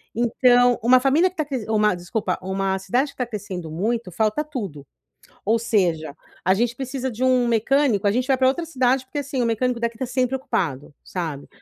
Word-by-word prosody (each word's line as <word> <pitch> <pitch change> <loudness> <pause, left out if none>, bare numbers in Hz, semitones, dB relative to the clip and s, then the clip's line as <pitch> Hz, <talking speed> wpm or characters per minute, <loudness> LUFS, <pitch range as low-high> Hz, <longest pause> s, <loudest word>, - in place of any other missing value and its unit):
Então, 245 +1 +4
uma 255 +2 +6
família 290 +8 +3
que 365 - -23
tá 310 -4 -1
cres 260 -7 -4
uma 210 -2 +3
desculpa, 180 +2 -3
uma 190 0 -1
cidade 250 +9 0
que - - -28
tá 250 -2 -2
crescendo 190 -6 -6
muito, 215 +3 -2
falta 220 - 0
tudo. 200 - -6 0.6
Ou 225 +3 +2
seja, 170 -10 0 0.3
a 185 - +4
gente 235 +3 0
precisa 265 0 -3
de 245 +2 -3
um 250 -2 +3
mecânico, 230 -2 +2
a 200 - +4
gente 250 +2 0
vai 265 - +4
pra 260 0 +4
outra 330 +5 -1
cidade 260 -3 +1
porque, 290 +2 -4
assim, 270 -2 -3
o - - +1
mecânico 235 +1 0
daqui 230 -1 -2
tá 260 - -2
sempre 255 +1 0
ocupado, 160 - -3
sabe. 160 -6 -5
235 Hz, 200 wpm, -23 LUFS, 195-260 Hz, 0.6 s, uma